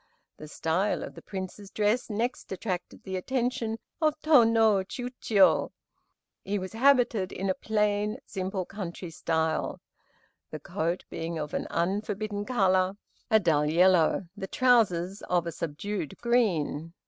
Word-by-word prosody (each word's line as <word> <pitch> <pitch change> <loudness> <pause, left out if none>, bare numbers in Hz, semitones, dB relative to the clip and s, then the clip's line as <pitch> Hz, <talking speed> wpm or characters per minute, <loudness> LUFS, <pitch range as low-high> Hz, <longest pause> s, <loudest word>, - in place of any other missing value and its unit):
The 155 - -9
style 165 +6 0
of - - -7
the - - -11
Prince's 195 +1 -7
dress 215 +5 0
next 235 +4 -3
attracted 185 -2 -4
the 190 -1 -4
attention 245 +1 -1 0.2
of 310 -1 +2
Tô 290 -8 +6
no 225 -2 +4
Chiûjiô. 230 -2 +2 0.7
He 205 +1 -1
was 190 0 -5
habited 235 -6 +3
in 190 +1 -1
a - - +1
plain, 210 0 0
simple 190 -1 -3
country 180 -3 -7
style, 160 0 -1 0.7
the - - -6
coat 170 +3 -2
being 165 0 -4
of 150 -1 -5
an - - -2
unforbidden 205 +3 -2
color, 190 -5 +2 0.3
a 220 -2 +6
dull 155 -6 +2
yellow, 175 +2 +4
the 195 -2 -5
trousers 200 -8 +2
of 175 -2 +2
a 170 - -3
subdued 165 +2 -4
green. 175 -10 0
195 Hz, 135 wpm, -28 LUFS, 175-220 Hz, 0.7 s, Tô